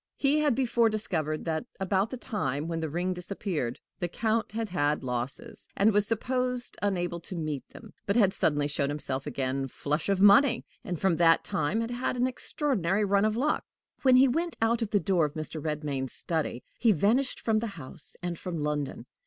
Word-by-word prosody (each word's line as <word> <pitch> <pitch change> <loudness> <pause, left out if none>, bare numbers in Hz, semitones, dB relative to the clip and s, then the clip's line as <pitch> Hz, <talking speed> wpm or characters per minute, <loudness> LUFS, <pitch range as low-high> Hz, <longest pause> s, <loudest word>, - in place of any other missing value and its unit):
He 285 +2 +3
had 295 -5 +3
before 235 -3 +3
discovered 160 -8 -1
that, 160 -2 -1 0.2
about 195 +2 +1
the 255 - -5
time 155 - -2
when 165 -1 -2
the 160 -1 -2
ring 175 +4 -1
disappeared, 180 - -3 0.2
the 175 - 0
Count 220 +5 -1
had 225 0 -3
had 150 -5 0
losses, 130 - -3
and 210 +2 +4
was 205 0 +3
supposed 250 +2 0
unable 175 -4 -1
to 180 +2 -6
meet 155 -5 -4
them, - - -13
but 200 - +2
had 200 -5 +4
suddenly 145 -1 +1
showed 140 -1 0
himself 140 -2 -3
again 135 0 -2
"flush 150 +6 -2
of 195 -1 +2
money," 235 +5 +6 0.2
and 175 -3 -4
from 190 -4 +2
that 165 -1 +5
time 200 +10 0
had 230 +1 -3
had 245 +1 -2
an 245 - +2
extraordinary 215 - 0
run 200 +1 +3
of 215 +1 +1
luck. 295 +5 +1 0.4
When 260 -2 +6
he 260 +2 +7
went 330 +7 -1
out 230 +1 +2
of 225 - -1
the 205 - +3
door 185 -5 +2
of 150 +1 -5
Mr. 155 -1 -5
Redmain's 145 -4 -2
study, 155 -7 -2 0.2
he 230 - +5
vanished 220 - +2
from 220 -1 +1
the 230 - -2
house 130 -4 -9
and 175 -2 -3
from 180 -3 -4
London. 150 -4 -2
185 Hz, 195 wpm, -28 LUFS, 150-230 Hz, 0.4 s, he